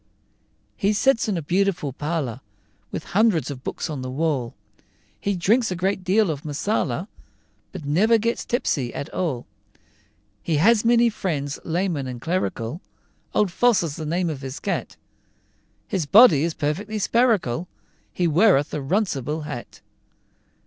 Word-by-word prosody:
He 200 +2 +1
sits 230 +2 +2
in 195 - 0
a 165 - -3
beautiful 180 -4 0
parlor, 145 -5 -3 0.5
With - - -5
hundreds 195 -5 +2
of 130 -2 -8
books - - -4
on 150 -5 -5
the 130 - -5
wall; 135 -3 -1 0.6
He 200 0 -1
drinks 220 +7 +2
a 185 - -2
great 190 +2 -1
deal 190 0 +3
of 145 -2 -6
Marsala, 155 - -1 0.6
But 180 -6 -8
never 200 +11 +4
gets 230 +2 -1
tipsy 140 - -1
at 140 - -6
all. 145 -10 -2 1.0
He 165 - -1
has 210 +8 +4
many 235 0 +4
friends, 145 -9 -3
lay 175 +4 0
men 145 -7 -3
and 125 -1 -6
clerical, 160 -3 -2 0.5
Old 205 -4 +2
Foss 235 -1 +3
is 155 -4 -3
the 155 - -5
name 170 +1 0
of 140 -3 -7
his 135 +1 -6
cat; - - -3 0.9
His 180 -7 -2
body 180 - +7
is 165 -1 -1
perfectly 205 +9 -2
spherical, 210 - +1 0.4
He 180 - -1
weareth 165 -3 +3
a - - -1
runcible 155 - -1
hat. 130 -5 -8
170 Hz, 150 wpm, -23 LUFS, 145-205 Hz, 1.0 s, body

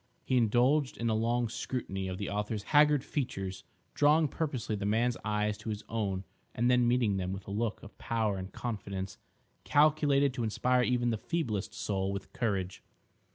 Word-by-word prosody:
He 130 - +1
indulged 125 +5 +3
in 115 -1 0
a - - +2
long 115 +2 +1
scrutiny 110 -4 -4
of 95 0 -4
the 100 - -3
author's 105 +1 -2
haggard 150 -2 +6
features 95 - -3 0.3
drawing 150 +1 +4
purposely 135 -9 -2
the 100 - -4
man's 115 +3 +2
eyes 105 0 0
to - - -6
his 105 0 -4
own 100 -4 -2 0.3
and 120 +2 +2
then 125 -1 +4
meeting 120 -5 +2
them 95 -1 -2
with 95 0 -6
a - - -5
look 110 +1 -2
of 105 - -12
power 110 -4 0
and 95 +1 -7
confidence 100 -5 -5 0.4
calculated 145 -2 +3
to 125 -2 -3
inspire 125 +3 +2
even 120 -1 +1
the 110 - -2
feeblest 105 - -2
soul 95 -1 -1
with 100 0 -6
courage. 100 -5 -2
115 Hz, 175 wpm, -31 LUFS, 100-125 Hz, 0.4 s, haggard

